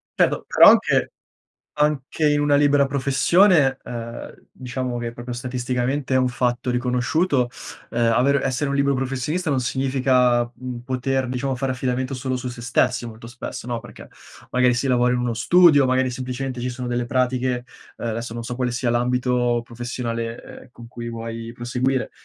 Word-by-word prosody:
Certo, -, -, +1 dB
però -, -, +8 dB
anche -, -, +2 dB, 0.6 s
anche 150 Hz, 0 st, +1 dB
in 145 Hz, -, +2 dB
una 145 Hz, 0 st, +2 dB
libera 145 Hz, -1 st, +4 dB
professione, 140 Hz, +2 st, +3 dB
ehm, 115 Hz, -1 st, -8 dB
diciamo 125 Hz, -1 st, -4 dB
che 120 Hz, -1 st, -4 dB
proprio 120 Hz, +1 st, -7 dB
statisticamente 125 Hz, +2 st, -2 dB
è -, -, +5 dB
un 130 Hz, -1 st, +3 dB
fatto 120 Hz, 0 st, -1 dB
riconosciuto, 125 Hz, +3 st, +1 dB, 0.4 s
ehm, 115 Hz, -1 st, +2 dB
aver 130 Hz, +4 st, +3 dB
essere 135 Hz, +2 st, -1 dB
un 140 Hz, -, 0 dB
libero 140 Hz, 0 st, +2 dB
professionista 135 Hz, +6 st, -2 dB
non 135 Hz, -, +1 dB
significa, 125 Hz, -1 st, +2 dB
mhmm, 125 Hz, -1 st, -7 dB
poter 130 Hz, +1 st, -1 dB
diciamo 130 Hz, +1 st, -2 dB
fare 130 Hz, 0 st, -1 dB
affidamento 130 Hz, +1 st, -2 dB
solo 130 Hz, 0 st, -2 dB
su 125 Hz, -, -6 dB
se 120 Hz, -1 st, -6 dB
stessi 120 Hz, 0 st, +1 dB
molto 115 Hz, 0 st, -10 dB
spesso, 120 Hz, 0 st, -7 dB
no, 120 Hz, -2 st, -3 dB
perché -, -, -13 dB, 0.4 s
magari 125 Hz, 0 st, +4 dB
si 120 Hz, +3 st, -1 dB
lavora 125 Hz, -1 st, +2 dB
in -, -, 0 dB
uno 120 Hz, -1 st, -1 dB
studio, 155 Hz, +4 st, +5 dB
magari 130 Hz, 0 st, +1 dB
semplicemente 125 Hz, 0 st, -4 dB
ci 125 Hz, -, -2 dB
sono 125 Hz, 0 st, -6 dB
delle 120 Hz, 0 st, -1 dB
pratiche, 125 Hz, 0 st, 0 dB, 0.3 s
ehm, -, -, -6 dB
adesso 115 Hz, +1 st, -4 dB
non 115 Hz, 0 st, -5 dB
so 125 Hz, +1 st, -4 dB
quale 125 Hz, 0 st, -1 dB
sia 120 Hz, 0 st, -1 dB
l'ambito 125 Hz, 0 st, +1 dB
professionale, 120 Hz, -1 st, -5 dB
ehm, -, -, -12 dB
con 120 Hz, -1 st, -13 dB
cui 120 Hz, 0 st, -7 dB
vuoi 115 Hz, 0 st, -6 dB
proseguire, 125 Hz, +2 st, -1 dB
125 Hz, 170 wpm, -22 LUFS, 120-135 Hz, 0.6 s, però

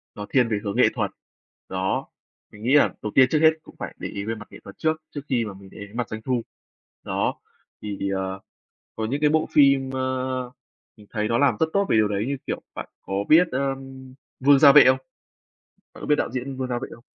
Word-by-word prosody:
nó 105 Hz, -, -6 dB
thiên 125 Hz, -3 st, +3 dB
về 105 Hz, -2 st, 0 dB
hướng 100 Hz, -1 st, -3 dB
nghệ -, -, +5 dB
thuật, -, -, -2 dB, 0.6 s
đó. 95 Hz, 0 st, -2 dB, 0.4 s
Mình 105 Hz, +1 st, -13 dB
nghĩ 130 Hz, +5 st, +2 dB
là 145 Hz, -, +5 dB
đầu 105 Hz, -, -4 dB
tiên 130 Hz, -, +7 dB
trước 155 Hz, -, +3 dB
hết 160 Hz, 0 st, +7 dB
cũng -, -, -16 dB
phải -, -, -6 dB
để -, -, -5 dB
ý 100 Hz, 0 st, -5 dB
về 115 Hz, +1 st, -2 dB
mặt 105 Hz, -1 st, -11 dB
nghệ -, -, -12 dB
thuật 100 Hz, -, -12 dB
trước, 155 Hz, 0 st, 0 dB
trước 145 Hz, -, -6 dB
khi 120 Hz, -4 st, +1 dB
mà 100 Hz, -, -7 dB
mình 95 Hz, 0 st, -14 dB
để -, -, -12 dB
ý 105 Hz, -, -7 dB
đến 105 Hz, +3 st, -14 dB
mặt 120 Hz, -2 st, -2 dB
doanh 110 Hz, 0 st, -6 dB
thu. 125 Hz, -1 st, -1 dB, 0.6 s
Đó, -, -, -1 dB, 0.5 s
thì, 100 Hz, -1 st, -4 dB
ờ, 95 Hz, 0 st, -3 dB, 0.6 s
có 110 Hz, -, -2 dB
những 140 Hz, +7 st, -2 dB
cái 150 Hz, -, +4 dB
bộ 155 Hz, +1 st, +1 dB
phim, 140 Hz, -2 st, +4 dB
ơ, 130 Hz, -1 st, -2 dB, 0.5 s
mình 105 Hz, -1 st, -17 dB
thấy 105 Hz, 0 st, -2 dB
nó 115 Hz, +1 st, +1 dB
làm 140 Hz, 0 st, +3 dB
rất 160 Hz, -, +4 dB
tốt 200 Hz, 0 st, +2 dB
về -, -, +3 dB
điều 105 Hz, -1 st, +4 dB
đấy 105 Hz, +1 st, -2 dB
như, 140 Hz, 0 st, -2 dB
kiểu, -, -, -3 dB
bạn -, -, -6 dB
có 95 Hz, -, -7 dB, 0.2 s
biết, 165 Hz, +3 st, +6 dB
ơm, 135 Hz, -1 st, -4 dB, 0.3 s
Vương 140 Hz, +1 st, +5 dB
Gia 145 Hz, -2 st, +9 dB
Vệ 150 Hz, -, +9 dB
không? 130 Hz, 0 st, +5 dB, 1.0 s
Bạn -, -, -13 dB
có -, -, -5 dB
biết 150 Hz, -, +4 dB
đạo -, -, -1 dB
diễn 130 Hz, +2 st, -4 dB
Vương 130 Hz, -, -2 dB
Gia 120 Hz, -1 st, -2 dB
Vệ -, -, -6 dB
không? 120 Hz, -, -20 dB
130 Hz, 245 wpm, -24 LUFS, 105-140 Hz, 1.0 s, Gia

